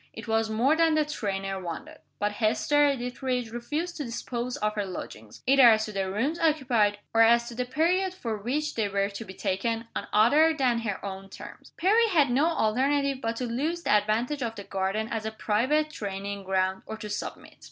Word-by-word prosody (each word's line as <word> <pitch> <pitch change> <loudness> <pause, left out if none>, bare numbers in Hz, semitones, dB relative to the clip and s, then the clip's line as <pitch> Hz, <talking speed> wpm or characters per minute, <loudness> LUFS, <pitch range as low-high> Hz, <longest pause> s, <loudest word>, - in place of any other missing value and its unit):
It - - -9
was 225 0 +1
more 240 +8 +2
than 325 -1 +3
the 305 -1 +2
trainer 195 -8 -3
wanted; 270 - -7 0.2
but 205 0 0
Hester 280 +7 +2
Dethridge 250 -1 -3
refused 300 +9 -4
to 300 - -3
dispose 240 0 -4
of 210 0 -1
her 210 -1 -1
lodgings 110 - -8
either 265 -2 +7
as 220 -1 +3
to 215 - -7
the 195 -2 -2
rooms 265 - -1
occupied, 250 -10 +2 0.2
or 225 - +4
as 235 +1 +5
to - - -8
the 250 +2 -2
period 340 +9 +1
for 230 -11 -3
which 280 +9 -2
they 215 -3 -1
were 200 0 0
to 205 +2 -7
be 190 -3 -11
taken 225 +6 -2
on - - -3
other 295 +10 +5
than 250 -4 +2
her 205 -4 -4
own 195 0 -7
terms. - - -11
Perry 435 +6 +4
had 310 - +3
no 280 +6 +3
alternative 275 0 +1
but 230 -1 -2
to 250 - -3
lose 300 +9 -2
the - - 0
advantage 220 +7 +1
of 230 -2 -2
the 200 - -7
garden 195 +3 -2
as 225 -1 -3
a 220 - -3
private 260 +9 0
training 200 -3 -5
ground, 190 0 0
or 220 - -5
to 215 - -7
submit. 205 0 -6
230 Hz, 205 wpm, -27 LUFS, 205-285 Hz, 0.2 s, either